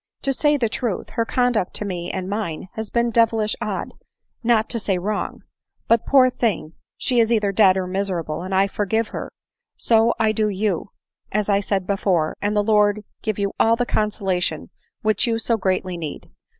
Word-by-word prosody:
To 275 Hz, -, +1 dB
say 295 Hz, +2 st, +2 dB
the 240 Hz, -4 st, +1 dB
truth, 220 Hz, -2 st, -3 dB
her 230 Hz, -, 0 dB
conduct 245 Hz, -6 st, 0 dB
to 210 Hz, -, 0 dB
me 175 Hz, -3 st, -4 dB
and 185 Hz, -1 st, -4 dB
mine 190 Hz, -4 st, -4 dB
has 220 Hz, -1 st, -5 dB
been 235 Hz, 0 st, +1 dB
devilish 225 Hz, -2 st, +2 dB
odd, 210 Hz, -4 st, -3 dB, 0.5 s
not 225 Hz, -2 st, +3 dB
to 235 Hz, -, +1 dB
say 195 Hz, -3 st, 0 dB
wrong. 205 Hz, +4 st, -3 dB, 0.4 s
But, 230 Hz, -1 st, +3 dB
poor 260 Hz, -2 st, +5 dB
thing,! 210 Hz, -10 st, -1 dB, 0.2 s
she 250 Hz, -2 st, +1 dB
is 225 Hz, 0 st, +3 dB
either 210 Hz, -3 st, +2 dB
dead 190 Hz, -2 st, +5 dB
or 185 Hz, -, -1 dB
miserable, 180 Hz, -5 st, -2 dB
and 185 Hz, +2 st, -6 dB
I 195 Hz, +1 st, +4 dB
forgive 215 Hz, +3 st, -1 dB
her; -, -, -5 dB, 0.3 s
— -, -, -63 dB
so 225 Hz, 0 st, +3 dB
I 220 Hz, -1 st, +3 dB
do 215 Hz, 0 st, +1 dB
you, 200 Hz, -2 st, -1 dB, 0.4 s
as 210 Hz, 0 st, 0 dB
I 200 Hz, -1 st, +4 dB
said 195 Hz, -2 st, -1 dB
before, 185 Hz, -5 st, 0 dB
and 210 Hz, +1 st, 0 dB
the 205 Hz, -, +3 dB
Lord 210 Hz, -1 st, +3 dB, 0.2 s
give 215 Hz, -3 st, -2 dB
you 200 Hz, -1 st, -1 dB
all 225 Hz, +1 st, +5 dB
the 245 Hz, +1 st, 0 dB
consola 205 Hz, -5 st, 0 dB
tion 155 Hz, 0 st, -2 dB, 0.3 s
which 215 Hz, +4 st, +2 dB
you 230 Hz, -1 st, +1 dB
so 230 Hz, +1 st, +1 dB
greatly 185 Hz, -3 st, -1 dB
need 155 Hz, -3 st, -7 dB
210 Hz, 195 wpm, -22 LUFS, 190-225 Hz, 0.5 s, poor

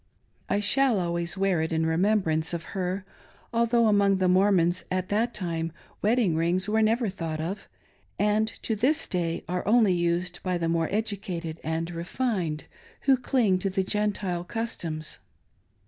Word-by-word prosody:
I 205 Hz, -, +2 dB
shall 255 Hz, +1 st, +3 dB
always 170 Hz, +1 st, -1 dB
wear 190 Hz, -4 st, +2 dB
it 160 Hz, -, -2 dB
in 160 Hz, 0 st, +1 dB
remembrance 165 Hz, -2 st, +1 dB
of 170 Hz, -, -5 dB
her, 185 Hz, 0 st, -2 dB, 0.5 s
although 235 Hz, 0 st, +3 dB
among 200 Hz, -2 st, +4 dB
the 185 Hz, -1 st, +2 dB
Mormons 185 Hz, -2 st, +3 dB
at 185 Hz, 0 st, -2 dB
that 225 Hz, +4 st, +1 dB
time 165 Hz, -5 st, -2 dB, 0.3 s
wedding 215 Hz, -5 st, +2 dB
rings 175 Hz, +4 st, +1 dB
were 220 Hz, +1 st, +2 dB
never 225 Hz, +2 st, +2 dB
thought 165 Hz, -5 st, -4 dB
of, 175 Hz, +6 st, -4 dB, 0.5 s
and 210 Hz, +1 st, +2 dB, 0.2 s
to 225 Hz, -, 0 dB
this 260 Hz, +9 st, +1 dB
day 170 Hz, -2 st, -2 dB
are 180 Hz, +1 st, -2 dB
only 220 Hz, -3 st, +5 dB
used 175 Hz, +1 st, -1 dB
by 185 Hz, -1 st, -1 dB
the 165 Hz, -1 st, -1 dB
more 165 Hz, -1 st, +1 dB
educated 190 Hz, -6 st, -3 dB
and 165 Hz, +2 st, -2 dB
refined 175 Hz, -2 st, -2 dB, 0.4 s
who 270 Hz, -, +5 dB
cling 240 Hz, -7 st, +1 dB
to 195 Hz, -, -1 dB
Gentile 200 Hz, -3 st, -1 dB
customs. 170 Hz, -8 st, -4 dB
185 Hz, 150 wpm, -27 LUFS, 170-210 Hz, 0.5 s, only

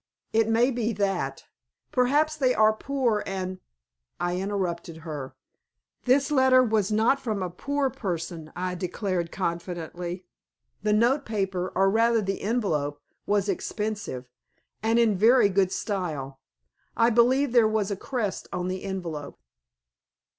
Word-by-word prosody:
It 225 Hz, 0 st, +3 dB
may 235 Hz, +4 st, +3 dB
be 235 Hz, -2 st, -1 dB
that. 195 Hz, -9 st, -2 dB, 0.5 s
Perhaps 290 Hz, +5 st, +2 dB
they 260 Hz, -4 st, +2 dB
are 215 Hz, 0 st, +5 dB
poor, 240 Hz, -3 st, 0 dB
and 185 Hz, -1 st, -4 dB, 0.3 s
" -, -, -66 dB, 0.3 s
I 175 Hz, 0 st, -1 dB
interrupted 180 Hz, -4 st, -3 dB
her. 145 Hz, -5 st, -6 dB, 0.7 s
"This 275 Hz, +4 st, +3 dB
letter 260 Hz, -2 st, +5 dB
was 220 Hz, -3 st, +1 dB
not 225 Hz, +6 st, +3 dB
from 215 Hz, -7 st, -2 dB
a 180 Hz, -, -3 dB
poor 280 Hz, +8 st, -1 dB
person," 170 Hz, -5 st, -4 dB
I 180 Hz, 0 st, -2 dB
declared, 180 Hz, -1 st, -2 dB
confidently. 175 Hz, 0 st, -4 dB, 0.6 s
"The 210 Hz, +1 st, +1 dB
notepaper, 210 Hz, -6 st, +1 dB
or 195 Hz, +1 st, +4 dB
rather 230 Hz, +2 st, +3 dB
the 195 Hz, 0 st, -3 dB
envelope, 160 Hz, -11 st, -1 dB, 0.3 s
was 205 Hz, -1 st, +2 dB
expensive, 205 Hz, -, -3 dB, 0.6 s
and 225 Hz, +2 st, +2 dB
in 230 Hz, -3 st, +4 dB
very 230 Hz, 0 st, +6 dB
good 190 Hz, -1 st, +2 dB
style. 155 Hz, -12 st, -3 dB, 0.6 s
I 230 Hz, +1 st, +4 dB
believe 250 Hz, +4 st, +4 dB
there 235 Hz, -2 st, +5 dB
was 215 Hz, -2 st, 0 dB
a -, -, 0 dB
crest 220 Hz, -1 st, -3 dB
on 180 Hz, 0 st, -2 dB
the 185 Hz, 0 st, -4 dB
envelope." 170 Hz, -7 st, -5 dB
205 Hz, 135 wpm, -26 LUFS, 180-235 Hz, 0.7 s, very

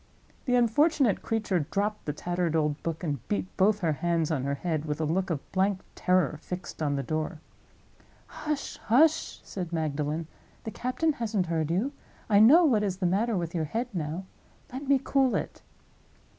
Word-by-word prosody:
The 250 Hz, -, +2 dB
unfortunate 245 Hz, -, +3 dB
creature 215 Hz, -5 st, 0 dB
dropped 210 Hz, +1 st, -1 dB
the 150 Hz, -, -1 dB
tattered 175 Hz, +1 st, -1 dB
old 150 Hz, -2 st, 0 dB
book, 165 Hz, +1 st, -4 dB
and 145 Hz, -5 st, -1 dB
beat 95 Hz, -2 st, -2 dB
both 205 Hz, +2 st, +3 dB
her 165 Hz, -3 st, +2 dB
hands 165 Hz, +2 st, 0 dB
on 135 Hz, -4 st, -1 dB
her 140 Hz, 0 st, 0 dB
head, 155 Hz, 0 st, -2 dB
with 150 Hz, -1 st, -3 dB
a -, -, 0 dB
look 185 Hz, +5 st, 0 dB
of 155 Hz, -5 st, -4 dB
blank 190 Hz, 0 st, +1 dB
terror 180 Hz, -5 st, +1 dB
fixed 180 Hz, -2 st, -7 dB
on 145 Hz, -2 st, +1 dB
the 140 Hz, -, -2 dB
door. 155 Hz, +4 st, -3 dB, 0.9 s
"Hush! 300 Hz, -2 st, -4 dB
hush!" 310 Hz, +8 st, +2 dB
said 180 Hz, -4 st, -6 dB
Magdalen. 155 Hz, 0 st, -1 dB, 0.4 s
"The 220 Hz, -, -5 dB
captain 255 Hz, +8 st, 0 dB
hasn't 220 Hz, -7 st, -1 dB
heard 160 Hz, -2 st, -1 dB
you. 200 Hz, +12 st, 0 dB, 0.4 s
I 200 Hz, -, +6 dB
know 295 Hz, +11 st, +8 dB
what 235 Hz, -8 st, +3 dB
is 195 Hz, -3 st, -1 dB
the 190 Hz, -, -2 dB
matter 205 Hz, +5 st, +1 dB
with 170 Hz, -2 st, -3 dB
your 165 Hz, -3 st, -1 dB
head 230 Hz, +10 st, -3 dB
now. 165 Hz, +2 st, -3 dB, 0.5 s
Let 270 Hz, +2 st, -5 dB
me 280 Hz, 0 st, +5 dB
cool 270 Hz, -2 st, +2 dB
it." -, -, -4 dB
180 Hz, 180 wpm, -28 LUFS, 155-225 Hz, 0.9 s, know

